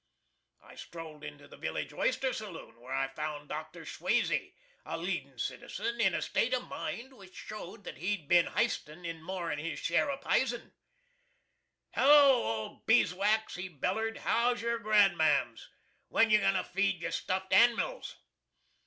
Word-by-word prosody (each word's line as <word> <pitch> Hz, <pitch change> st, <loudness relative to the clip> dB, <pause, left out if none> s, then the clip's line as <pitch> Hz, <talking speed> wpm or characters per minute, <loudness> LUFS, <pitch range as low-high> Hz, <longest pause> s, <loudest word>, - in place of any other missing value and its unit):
I -, -, -15 dB
strolled 160 Hz, -3 st, -10 dB
into 145 Hz, -1 st, -9 dB
the -, -, -14 dB
village -, -, -4 dB
oyster 270 Hz, -, 0 dB
saloon, 185 Hz, -, -8 dB
where 125 Hz, +2 st, -11 dB
I 135 Hz, 0 st, 0 dB
found 145 Hz, +1 st, -5 dB
Dr. 155 Hz, +2 st, -6 dB
SCHWAZEY, -, -, 0 dB, 0.3 s
a -, -, -4 dB
leadin' -, -, -4 dB
citizen 235 Hz, 0 st, -3 dB
in 190 Hz, -5 st, +3 dB
a -, -, -1 dB
state 250 Hz, +2 st, +1 dB
of 250 Hz, -, -4 dB
mind 260 Hz, +3 st, -5 dB
which 190 Hz, -5 st, -15 dB
showed 205 Hz, -2 st, -8 dB
that -, -, -8 dB
he'd 180 Hz, -3 st, -2 dB
bin 175 Hz, +1 st, +5 dB
histin' 175 Hz, -7 st, -2 dB
in 165 Hz, -1 st, -5 dB
more'n 170 Hz, -3 st, -3 dB
his 165 Hz, +2 st, -4 dB
share 170 Hz, +12 st, +1 dB
of 280 Hz, 0 st, -3 dB
pizen. 245 Hz, -2 st, 0 dB, 1.2 s
"Hello, 285 Hz, 0 st, +7 dB
old 110 Hz, -1 st, -4 dB
Beeswax," 215 Hz, 0 st, +3 dB
he 180 Hz, +1 st, -5 dB
bellered; 215 Hz, +8 st, -2 dB
"how's 240 Hz, +1 st, +1 dB
yer 235 Hz, 0 st, 0 dB
grandmams? 210 Hz, -3 st, +3 dB, 0.4 s
When 225 Hz, -1 st, +3 dB
you 215 Hz, -, +7 dB
goin' 195 Hz, -, +2 dB
to 185 Hz, -, +1 dB
feed 195 Hz, -1 st, 0 dB
your -, -, -2 dB
stuffed 190 Hz, +1 st, -2 dB
animils?" 240 Hz, -, +3 dB
190 Hz, 155 wpm, -31 LUFS, 165-230 Hz, 1.2 s, Hello